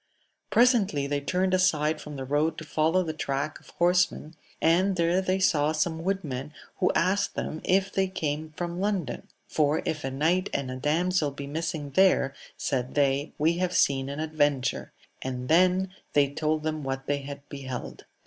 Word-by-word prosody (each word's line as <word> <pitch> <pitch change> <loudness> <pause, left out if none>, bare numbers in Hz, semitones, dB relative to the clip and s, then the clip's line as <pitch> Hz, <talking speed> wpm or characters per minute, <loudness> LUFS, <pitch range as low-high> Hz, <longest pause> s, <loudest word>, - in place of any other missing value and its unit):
Presently 225 - +3
they 145 0 -1
turned 185 +5 0
aside 155 -4 +2
from 150 0 -8
the 135 -1 -5
road 150 +4 +1
to - - -6
follow 160 +4 +1
the 160 -2 -3
track 140 -1 -3
of - - -19
horsemen, 175 -2 +1 0.3
and 185 +4 +3
there 170 +2 +2
they 185 0 0
saw 155 -5 +2
some 160 +1 -1
woodmen, 150 -7 -3 0.2
who - - +2
asked 190 +3 +1
them 155 - -4
if 195 +1 +2
they 190 0 +2
came 155 -4 -3
from 175 0 -3
London, 200 -5 -2 0.2
for 150 0 +1
if 155 -2 -2
a 135 - -1
knight 165 +8 +1
and 135 -2 -2
a - - -4
damsel 155 +4 +1
be 140 0 -7
missing 150 0 -4
there, 180 -4 +4 0.2
said 130 -2 -2
they, 140 +1 +1
we 165 +3 +2
have 185 0 0
seen 135 -1 +2
an 140 +2 -5
adventure; 145 -4 0 0.3
and 125 -1 -4
then 185 +3 +4 0.2
they 145 -1 +4
told 155 +1 0
them 155 -1 -2
what 135 0 -3
they 145 0 0
had 140 0 -9
beheld. 130 -3 -7
155 Hz, 175 wpm, -27 LUFS, 140-180 Hz, 0.3 s, there